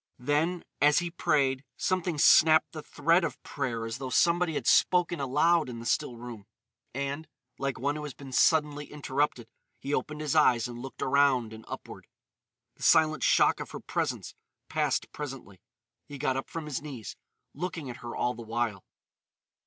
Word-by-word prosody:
Then, 150 +7 0 0.2
as 145 0 +5
he 175 -1 0
prayed, 140 -5 +1
something 180 -3 -1
snapped 155 +2 +6
the - - -7
thread - - +2
of - - -3
prayer 115 -2 -3
as 115 +3 -5
though 130 -1 -4
somebody 170 +2 +2
had - - -3
spoken 175 -2 +3
aloud 150 +3 +2
in 120 - -6
the 115 - -8
still 120 0 0
room; 115 -4 -9 0.4
and, 140 +4 -4 0.3
like 140 -1 -2
one 140 +4 -1
who 150 - -5
has 150 -2 -7
been 135 -2 -11
suddenly 150 +1 +2
interrupted, 140 -4 -1 0.3
he 140 - -5
opened 150 +3 -2
his 150 -1 -1
eyes 125 -7 +4
and 120 -1 -8
looked 130 0 -6
around 130 -4 +2
and 110 0 -11
upward. - - -9 0.7
The - - -20
silent 155 -1 +4
shock - - +4
of - - -6
her - - -7
presence - - -3 0.4
passed - - 0
presently. 130 -10 -8 0.5
He 145 -1 -8
got 130 -1 0
up 135 - -4
from 165 -2 -5
his 150 -4 -4
knees, 130 -9 -8 0.4
looking 175 -5 -5
at 120 -2 -7
her 120 -1 -7
all 125 - 0
the 120 - -9
while. 115 -3 -2
140 Hz, 175 wpm, -29 LUFS, 125-155 Hz, 0.7 s, snapped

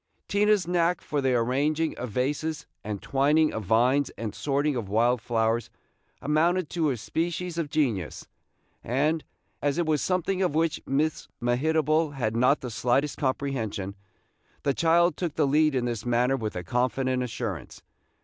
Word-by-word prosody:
Tina's 205 -3 +2
knack 175 0 +2
for 145 -2 -2
the 130 -2 +2
arranging 145 +7 +1
of 125 - -4
vases 145 +7 -2 0.2
and 105 -1 -5
twining 150 +3 +3
of 110 - -4
vines 125 +7 +3
and 110 -3 -4
sorting 145 +2 0
of 110 -6 -4
wild 115 +3 +2
flowers 115 0 0 0.5
amounted 160 +4 +1
to 165 -3 +1
a 130 - -1
species 170 +7 -3
of 155 -3 -2
genius; 125 - -1 0.6
and, 150 +6 0 0.4
as 145 -1 0
it 175 - +1
was 155 -2 +1
something 185 +1 0
of 180 -6 +1
which 165 0 +1
Miss 150 +3 0
Mehitable 155 +4 +1
had 115 -4 -1
not 125 +5 +3
the 125 - -5
slightest 130 +5 0
comprehension, 115 -8 -2 0.7
the 140 - +2
child 170 +3 +3
took 170 -5 -3
the 155 - +2
lead 150 +1 +3
in 125 -2 0
this 115 -3 -3
matter 125 +2 +2
with 110 -5 -4
a 90 - -4
confident 125 +5 0
assurance. 115 -8 -5
140 Hz, 160 wpm, -27 LUFS, 120-155 Hz, 0.7 s, twining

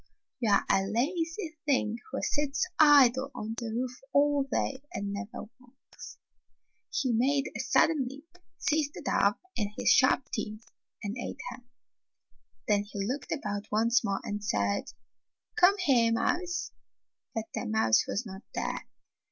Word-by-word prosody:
You 225 -4 +1
are 200 - +4
a 195 0 +2
lazy 325 - -1
thing 235 -5 +1
who - - -3
sits 295 +2 0
idle 275 -3 +6
on 220 -2 -4
the 235 - -4
roof 250 +2 -3
all 285 -1 +3
day 270 -1 -1
and 200 0 -3
never 200 +5 -6 0.2
works." 255 +1 -14 0.7
He 255 -4 0
made 270 +5 +1
a - - -4
sudden 300 -6 +3
leap, 290 +7 -12 0.2
seized 300 -1 0
the - - -8
dove 200 +1 +2 0.2
in 210 -3 -1
his - - +3
sharp - - +5
teeth 215 +1 -4 0.4
and 205 +1 -3
ate - - -5
her. - - -10 1.1
Then 205 -1 +3
he 195 -1 -3
looked 265 +6 -4
about 210 -8 -3
once 230 +3 +3
more 195 -1 -1
and 205 0 -4
said, 100 - 0 0.7
"Come 395 -1 +5
here, 255 -11 +3
mouse." 345 +9 -1 0.6
But 220 -1 -3
the - - -3
mouse 215 - +3
was 230 - -2
not 190 -1 -8
there. - - -3
245 Hz, 150 wpm, -29 LUFS, 210-290 Hz, 1.1 s, idle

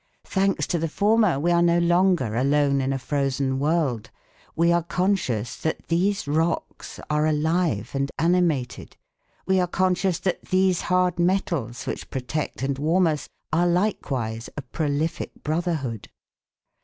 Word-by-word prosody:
Thanks 195 0 +1
to 175 - -1
the 165 - -1
former 205 -3 +2
we 170 +4 +1
are 170 0 +4
no 170 0 +4
longer 175 - +2
alone 140 +2 +2
in 135 +1 -1
a 135 - 0
frozen 135 0 -1
world. 145 -7 0 0.5
We 170 +1 +3
are 170 0 +3
conscious 170 - -1
that 160 - -4
these 185 +1 +1
rocks 160 +3 -2
are 150 +1 +2
alive 155 - 0
and 140 0 -1
animated, 165 -7 0 0.5
we 190 0 +2
are 180 - +1
conscious 185 0 +1
that 180 -1 -2
these 185 -1 +2
hard 180 -1 +1
metals 170 - 0
which - - -5
protect 135 +2 -4
and 135 0 -1
warm 170 +5 +3
us 155 -3 -1 0.2
are 175 +2 +3
likewise 135 - -1
a 145 - -4
prolific 150 +3 -2
brotherhood. 155 - -2
160 Hz, 145 wpm, -24 LUFS, 140-180 Hz, 0.5 s, are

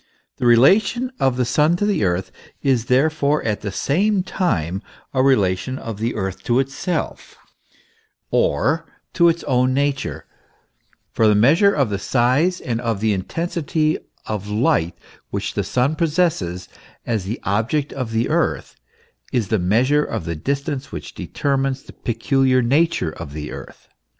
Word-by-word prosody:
The 125 - 0
relation 200 - +4
of 130 -2 +2
the 125 - +1
Sun 150 +7 +3
to 205 - 0
the 205 - +1
Earth 95 0 -1 0.3
is 130 -5 +2
therefore 145 +3 +2
at 105 -2 -1
the 100 - -4
same 190 - +1
time 95 - -1 0.3
a 130 - +2
relation 105 -3 +2
of 115 -5 -6
the 115 +2 -1
Earth 95 -2 -3
to 120 - +2
itself, 135 +6 -3 0.9
or 140 - +1 0.3
to 170 -1 +5
its 170 0 -1
own 130 -1 +2
nature, 140 0 -1 0.9
for 110 - +3
the 105 - +4
measure 155 - +5
of 140 - 0
the 100 - -1
size 135 - +2
and 115 -1 -3
of 115 -4 -1
the 110 0 +1
intensity 155 - -1 0.3
of 105 -2 -4
light 105 -6 +1 0.3
which 100 +1 -3
the 100 - -1
Sun 130 +9 0
possesses 150 - 0 0.4
as 110 -5 -1
the 110 +5 -4
object 115 +9 0
of 130 -4 -4
the 115 +1 0
Earth, - - -1 0.6
is 115 -7 0
the 110 - +2
measure 125 +11 +2
of 85 - -4
the 85 - -3
distance, 140 - -3
which - - -7
determines 135 -1 -2
the - - -13
peculiar 130 +2 +1
nature 140 - +2
of 80 -3 -9
the 75 0 -6
Earth. - - -10
130 Hz, 155 wpm, -21 LUFS, 105-150 Hz, 0.9 s, to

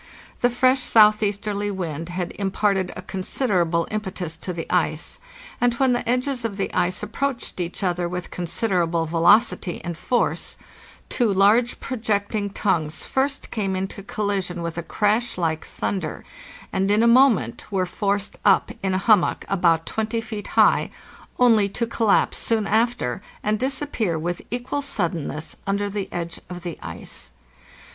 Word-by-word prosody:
The 245 - +3
fresh 255 +2 +3
southeasterly 210 -3 +3
wind 165 -4 -4
had 175 0 -3
imparted 195 -1 0
a 185 - -7
considerable 185 -3 0
impetus 190 -6 -4
to 180 - -5
the 170 -2 -4
ice, - - 0 0.4
and 240 -1 +3
when 265 -1 +3
the 245 - -2
edges 250 0 0
of 215 -4 -3
the 195 - -2
ice 180 +2 0
approached 240 +1 -3
each 175 +3 -3
other 175 -1 0
with 180 0 -5
considerable 175 -2 0
velocity 175 +3 +3
and 170 -1 -4
force, 245 +8 -1 0.5
two 235 -5 +1
large 210 +5 +4
projecting 210 -4 -1
tongues 170 -6 0
first 275 +1 -1
came 195 -4 -1
into 190 +1 -4
collision 195 -4 -2
with 170 -1 -4
a - - -2
crash 215 +6 0
like 160 -3 -1
thunder, 180 -6 -4 0.5
and 195 +1 +1
in 210 +2 +4
a - - +5
moment 235 - +3
were 190 -2 +1
forced 200 +2 -2
up 195 - +4
in 190 -1 0
a 190 - -2
hum 215 -4 +7
mock - - -2
about 170 -4 +2
20 220 +1 -2
feet 220 -2 -6
high, - - +5 0.5
only 225 -5 +5
to 235 +4 -2
collapse 225 -2 +2
soon 225 -2 +1
after, 220 - +1 0.2
and 210 0 +1
disap 275 +3 -1
pear 180 -8 0
with 175 +2 -3
equal 245 +4 -2
suddenness 170 - -3
under 200 +1 0
the 200 -1 -3
edge 170 -1 -4
of 180 -1 -7
the 170 -3 -6
ice. 60 - -6
200 Hz, 155 wpm, -23 LUFS, 175-225 Hz, 0.5 s, hum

